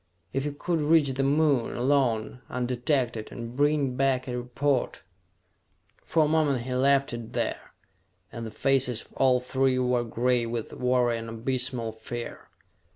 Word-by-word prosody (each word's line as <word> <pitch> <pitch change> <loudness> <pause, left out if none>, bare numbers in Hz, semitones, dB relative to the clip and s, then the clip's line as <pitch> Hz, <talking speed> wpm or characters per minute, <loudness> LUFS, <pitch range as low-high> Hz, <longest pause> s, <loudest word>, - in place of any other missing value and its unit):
If 135 +1 -1
you 145 - -2
could 165 +3 -1
reach 150 -1 +4
the 135 +1 -1
Moon, 140 -3 +2
alone, 125 -3 +1
undetected, 125 -2 -1
and 115 +1 -7
bring 145 -2 +2
back 135 -1 +1
a 125 - -3
report...." 125 +2 -1 1.0
For 160 -1 +3
a - - +1
moment 150 -5 +2
he 130 +1 -4
left 135 +1 +3
it 115 -1 -7
there, - - -3 0.6
and 115 - -6
the 115 - -5
faces 130 -1 +1
of - - -16
all 130 -2 +3
three 130 +1 +1
were 125 -1 +1
gray 120 +1 0
with 115 -1 -4
worry 125 -2 +1
and 115 0 -7
abysmal 120 0 -2
fear. 115 +2 -7
125 Hz, 155 wpm, -27 LUFS, 120-140 Hz, 1.0 s, reach